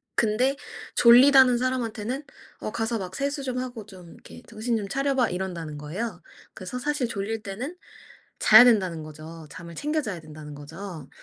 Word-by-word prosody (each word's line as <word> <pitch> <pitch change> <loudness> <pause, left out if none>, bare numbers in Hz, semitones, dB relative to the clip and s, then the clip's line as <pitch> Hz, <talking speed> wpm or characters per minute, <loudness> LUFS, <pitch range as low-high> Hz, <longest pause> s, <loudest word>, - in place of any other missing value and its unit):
근데 240 +5 +2 0.4
졸리다는 255 +1 +7
사람한테는 250 +1 -2 0.4
"어 - - -4
가서 225 +1 -1
막 185 -1 -6
세수 280 0 -2
좀 255 -2 -3
하고 245 -4 -6
좀 185 -4 -13
이렇게 - - -14
정신 230 +1 -2
좀 205 -2 -4
차려 275 +5 0
봐." 250 -4 +2
이런다는 175 -5 -4
거예요. 175 +11 -5 0.3
그래서 250 - -6
사실 290 -1 -1
졸릴 220 0 -4
때는 235 - -5 0.6
자야 220 +3 +9
된다는 185 -9 +2
거죠. 155 +1 -10
잠을 170 0 -10
챙겨 300 - -1
자야 200 -9 -5
된다는 155 -1 -10
거죠. 160 +1 -9
220 Hz, 340 characters per minute, -26 LUFS, 175-255 Hz, 0.6 s, 자야